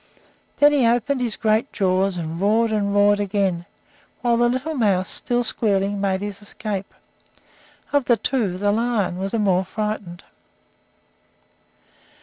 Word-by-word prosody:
Then 290 Hz, 0 st, +6 dB
he 275 Hz, -5 st, +3 dB
opened 245 Hz, +3 st, +1 dB
his 235 Hz, -3 st, -1 dB
great 220 Hz, +4 st, +1 dB
jaws 190 Hz, -1 st, +1 dB
and 165 Hz, +1 st, -5 dB
roared 220 Hz, +3 st, +2 dB
and 205 Hz, -2 st, 0 dB
roared 205 Hz, 0 st, +4 dB
again, 195 Hz, -4 st, -1 dB, 0.5 s
while 240 Hz, -1 st, +2 dB
the 240 Hz, +1 st, +3 dB
little 260 Hz, +6 st, -2 dB
mouse, 200 Hz, -8 st, +1 dB
still 245 Hz, 0 st, -1 dB
squealing, 200 Hz, -3 st, 0 dB
made 190 Hz, -1 st, 0 dB
his 205 Hz, 0 st, -6 dB
escape. 205 Hz, -1 st, -5 dB, 1.0 s
Of 285 Hz, -3 st, +2 dB
the 240 Hz, -2 st, +3 dB
two, 220 Hz, -5 st, -1 dB
the 205 Hz, +1 st, +1 dB
lion 215 Hz, -5 st, 0 dB
was 195 Hz, +2 st, -3 dB
the -, -, +1 dB
more 190 Hz, -3 st, +2 dB
frightened. 205 Hz, -3 st, -5 dB
205 Hz, 140 wpm, -22 LUFS, 195-235 Hz, 1.0 s, Then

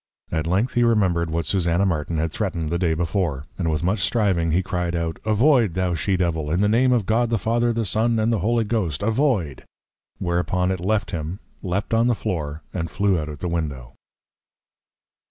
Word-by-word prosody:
At 80 Hz, 0 st, -1 dB
length 100 Hz, +8 st, +1 dB
he 120 Hz, -, +2 dB
remembred 95 Hz, -8 st, +2 dB
what 80 Hz, +1 st, -1 dB
Susanna 90 Hz, 0 st, +1 dB
Martin 80 Hz, -3 st, -1 dB
had 80 Hz, +1 st, -1 dB
threatned 85 Hz, -6 st, -2 dB
the 85 Hz, -, 0 dB
Day 85 Hz, -3 st, +1 dB
before; 80 Hz, -4 st, -1 dB
and 85 Hz, -3 st, 0 dB
with 80 Hz, +1 st, -1 dB
much 95 Hz, +5 st, +1 dB
striving 95 Hz, -5 st, +1 dB
he 90 Hz, +4 st, +2 dB
cried 90 Hz, -2 st, -2 dB
out, 85 Hz, -1 st, -2 dB
Avoid, 110 Hz, -, +3 dB
thou 90 Hz, -1 st, 0 dB
She 95 Hz, +3 st, 0 dB
Devil! 80 Hz, -4 st, -1 dB
In 85 Hz, +5 st, +1 dB
the 105 Hz, -, +3 dB
Name 125 Hz, +4 st, +3 dB
of 120 Hz, -5 st, +2 dB
God 115 Hz, +3 st, +2 dB
the 115 Hz, -, +1 dB
Father, 120 Hz, +4 st, +1 dB
the 115 Hz, -1 st, -1 dB
Son, 115 Hz, +4 st, +1 dB
and 110 Hz, +1 st, +2 dB
the 110 Hz, -, +1 dB
Holy 115 Hz, +5 st, +1 dB
Ghost, 100 Hz, -8 st, -1 dB
Avoid! 110 Hz, -, 0 dB, 0.5 s
Whereupon 90 Hz, +1 st, 0 dB
it 95 Hz, -, -2 dB
left 105 Hz, +4 st, 0 dB
him, 80 Hz, +2 st, -4 dB, 0.2 s
leap'd 95 Hz, +4 st, -2 dB
on 115 Hz, +1 st, +3 dB
the 120 Hz, -, +2 dB
Floor, 80 Hz, -8 st, -4 dB
and 85 Hz, -2 st, -3 dB
flew 100 Hz, -1 st, +1 dB
out 75 Hz, 0 st, -4 dB
at 75 Hz, 0 st, -8 dB
the 90 Hz, -, -2 dB
Window. 75 Hz, -8 st, -3 dB
90 Hz, 200 wpm, -23 LUFS, 85-110 Hz, 0.5 s, Avoid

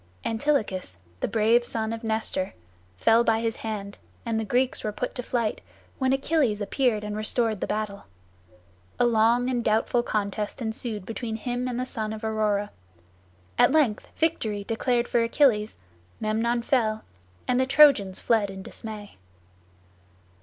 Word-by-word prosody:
Antilochus, 220 Hz, -, -1 dB, 0.2 s
the -, -, 0 dB
brave 230 Hz, +2 st, +3 dB
son 225 Hz, -2 st, -2 dB
of 230 Hz, +1 st, -6 dB
Nestor, 220 Hz, -4 st, -1 dB, 0.4 s
fell 225 Hz, -, +4 dB
by 225 Hz, -1 st, +2 dB
his 225 Hz, -1 st, -2 dB
hand, 205 Hz, -2 st, -5 dB, 0.3 s
and 225 Hz, -1 st, 0 dB
the -, -, -1 dB
Greeks 245 Hz, +4 st, 0 dB
were 215 Hz, -, -1 dB
put 250 Hz, +4 st, -4 dB
to 250 Hz, -, -4 dB
flight, 235 Hz, -3 st, -1 dB, 0.4 s
when 260 Hz, -1 st, +2 dB
Achilles 270 Hz, -5 st, +1 dB
appeared 215 Hz, 0 st, 0 dB
and 210 Hz, 0 st, -4 dB
restored 215 Hz, 0 st, 0 dB
the -, -, -1 dB
battle. 210 Hz, -1 st, -3 dB, 0.9 s
A -, -, +4 dB
long 235 Hz, +1 st, +3 dB
and 245 Hz, -2 st, 0 dB
doubtful 225 Hz, +2 st, +2 dB
contest 210 Hz, -1 st, -2 dB
ensued 220 Hz, -3 st, -4 dB
between 225 Hz, +1 st, -4 dB
him 245 Hz, +2 st, -3 dB
and 245 Hz, -1 st, -2 dB
the 255 Hz, -, -1 dB
son 220 Hz, -3 st, -4 dB
of 220 Hz, +1 st, -8 dB
Aurora; 210 Hz, -2 st, 0 dB, 0.9 s
at -, -, +6 dB
length 285 Hz, -9 st, +2 dB
victory 220 Hz, -11 st, 0 dB
declared 235 Hz, +2 st, 0 dB
for 235 Hz, -, +2 dB
Achilles, 230 Hz, -3 st, +2 dB, 0.4 s
Memnon 230 Hz, +2 st, 0 dB
fell, 220 Hz, -4 st, +1 dB, 0.4 s
and 250 Hz, 0 st, +2 dB
the 260 Hz, -, +2 dB
Trojans 265 Hz, -10 st, +5 dB
fled 220 Hz, -4 st, +2 dB
in 190 Hz, 0 st, -8 dB
dismay. 210 Hz, -1 st, -8 dB
225 Hz, 150 wpm, -26 LUFS, 215-245 Hz, 0.9 s, at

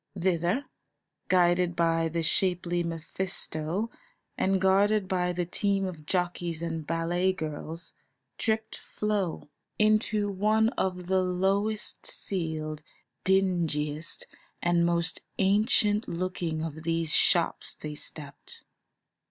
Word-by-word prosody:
Thither, 180 Hz, -, +1 dB, 0.6 s
guided 175 Hz, -1 st, +3 dB
by 165 Hz, -1 st, +2 dB
the 165 Hz, +1 st, -1 dB
shapely 175 Hz, 0 st, +2 dB
Mephisto 170 Hz, +3 st, -2 dB, 0.4 s
and 190 Hz, 0 st, +2 dB
guarded 195 Hz, +2 st, +3 dB
by 180 Hz, -1 st, +1 dB
the 175 Hz, 0 st, -1 dB
team 195 Hz, +2 st, 0 dB
of 160 Hz, -5 st, -7 dB
jockeys 175 Hz, -2 st, -1 dB
and 165 Hz, -2 st, -3 dB
ballet 175 Hz, +3 st, +1 dB
girls, 160 Hz, 0 st, -6 dB, 0.5 s
tripped 220 Hz, 0 st, 0 dB
Flo. 200 Hz, -8 st, -2 dB, 0.3 s
Into 215 Hz, -1 st, +3 dB
one 215 Hz, +3 st, +2 dB
of 180 Hz, -6 st, -2 dB
the 190 Hz, +1 st, +2 dB
lowest 195 Hz, +4 st, 0 dB
ceiled, 155 Hz, -5 st, -3 dB, 0.4 s
dingiest, 170 Hz, -5 st, 0 dB, 0.3 s
and 170 Hz, 0 st, +2 dB
most 170 Hz, 0 st, 0 dB, 0.2 s
ancient 210 Hz, +2 st, +3 dB
looking 170 Hz, -2 st, -2 dB
of 160 Hz, -1 st, -5 dB
these 165 Hz, -1 st, 0 dB
shops -, -, +2 dB
they 150 Hz, 0 st, -6 dB
stepped. 145 Hz, -1 st, -9 dB
180 Hz, 105 wpm, -28 LUFS, 165-195 Hz, 0.6 s, guided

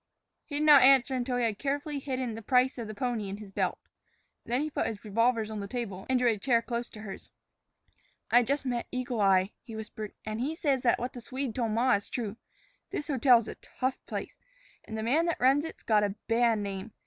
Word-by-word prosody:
He 290 Hz, -, -6 dB
did 295 Hz, -, 0 dB
not 295 Hz, -2 st, +9 dB
answer 265 Hz, +1 st, +6 dB
until 250 Hz, -1 st, -1 dB
he 245 Hz, -, +1 dB
had 220 Hz, -3 st, 0 dB
carefully 285 Hz, +1 st, -2 dB
hidden 260 Hz, -3 st, -3 dB
the 225 Hz, -, -7 dB
price 250 Hz, +3 st, +2 dB
of 230 Hz, -, -4 dB
the 215 Hz, -, -7 dB
pony 235 Hz, -4 st, -2 dB
in 195 Hz, -, -5 dB
his 205 Hz, -2 st, -11 dB
belt. -, -, -1 dB, 0.7 s
Then 245 Hz, +3 st, 0 dB
he 305 Hz, +1 st, -2 dB
put -, -, -1 dB
his 220 Hz, -1 st, -6 dB
revolvers 225 Hz, +1 st, +1 dB
on 215 Hz, -, -4 dB
the 200 Hz, -, -5 dB
table 200 Hz, -5 st, -5 dB
and 260 Hz, -, +3 dB
drew 250 Hz, 0 st, +2 dB
a 220 Hz, -3 st, 0 dB
chair 235 Hz, +1 st, +2 dB
close 235 Hz, 0 st, -3 dB
to 215 Hz, -, -11 dB
hers. 195 Hz, -3 st, -9 dB, 1.0 s
"I 245 Hz, -, +7 dB
just 275 Hz, +3 st, -1 dB
met 245 Hz, -2 st, -2 dB
Eagle 250 Hz, -3 st, -2 dB
Eye," 195 Hz, 0 st, +4 dB
he 230 Hz, -2 st, -10 dB
whispered, 215 Hz, -1 st, -7 dB
"an' 215 Hz, 0 st, -4 dB
he 285 Hz, +6 st, -1 dB
says 280 Hz, -5 st, +1 dB
that 245 Hz, -, +3 dB
what 245 Hz, +2 st, -4 dB
the 245 Hz, -, -8 dB
Swede 260 Hz, 0 st, -4 dB
told 230 Hz, -3 st, -1 dB
ma 245 Hz, +3 st, +3 dB
is 205 Hz, 0 st, -1 dB
true. 220 Hz, -3 st, -4 dB, 0.5 s
This 295 Hz, -, -4 dB
hotel's 245 Hz, -4 st, +4 dB
a -, -, -5 dB
tough 260 Hz, 0 st, -4 dB
place, -, -, -6 dB, 0.5 s
and 220 Hz, -, -6 dB
the 220 Hz, -, -3 dB
man 300 Hz, +9 st, +2 dB
that 335 Hz, -, -1 dB
runs 270 Hz, +4 st, +4 dB
it 325 Hz, -, -8 dB
's -, -, -17 dB
got 215 Hz, -2 st, +3 dB
a 200 Hz, -1 st, -1 dB
bad 230 Hz, 0 st, +3 dB
name. 200 Hz, +1 st, -5 dB
240 Hz, 230 wpm, -29 LUFS, 215-260 Hz, 1.0 s, not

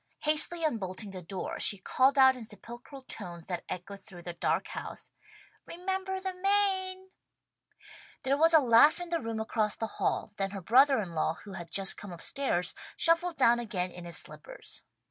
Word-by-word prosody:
Hastily 310 Hz, +3 st, +3 dB
unbolting 200 Hz, -6 st, -3 dB
the 185 Hz, -1 st, -7 dB
door 185 Hz, +2 st, -5 dB
she 200 Hz, -, +5 dB
called 260 Hz, +8 st, +2 dB
out 265 Hz, -1 st, +7 dB
in 250 Hz, -, -8 dB
sepulchral 240 Hz, +5 st, -10 dB
tones 175 Hz, -9 st, -8 dB
that 180 Hz, -2 st, -4 dB
echoed 195 Hz, +3 st, -6 dB
through 175 Hz, -4 st, -12 dB
the 175 Hz, -, -5 dB
dark 170 Hz, -, -1 dB
house, -, -, -7 dB, 0.6 s
"Remember 380 Hz, +2 st, -3 dB
the 380 Hz, 0 st, -4 dB
Maine!" 380 Hz, -1 st, +1 dB, 1.1 s
There 270 Hz, +1 st, +2 dB
was 325 Hz, +3 st, +5 dB
a -, -, +9 dB
laugh 260 Hz, +5 st, +5 dB
in 350 Hz, -1 st, -6 dB
the 335 Hz, -1 st, 0 dB
room 225 Hz, -1 st, -4 dB
across 220 Hz, -1 st, -1 dB
the 225 Hz, -, -3 dB, 0.2 s
hall, -, -, -1 dB
then 195 Hz, 0 st, -1 dB
her 195 Hz, 0 st, -7 dB
brother 265 Hz, +7 st, +5 dB
in 190 Hz, -5 st, -4 dB
law 160 Hz, 0 st, 0 dB
who 200 Hz, -, -10 dB
had 175 Hz, -3 st, -8 dB
just 190 Hz, +3 st, 0 dB
come 205 Hz, -, -9 dB
up 170 Hz, -, -10 dB
stairs, 260 Hz, -11 st, 0 dB, 0.2 s
shuffled 335 Hz, +1 st, +3 dB
down 240 Hz, -4 st, +4 dB
again 185 Hz, -6 st, -2 dB
in 175 Hz, 0 st, -10 dB
his 170 Hz, -, -1 dB
slippers. -, -, -5 dB
235 Hz, 185 wpm, -30 LUFS, -, 1.1 s, a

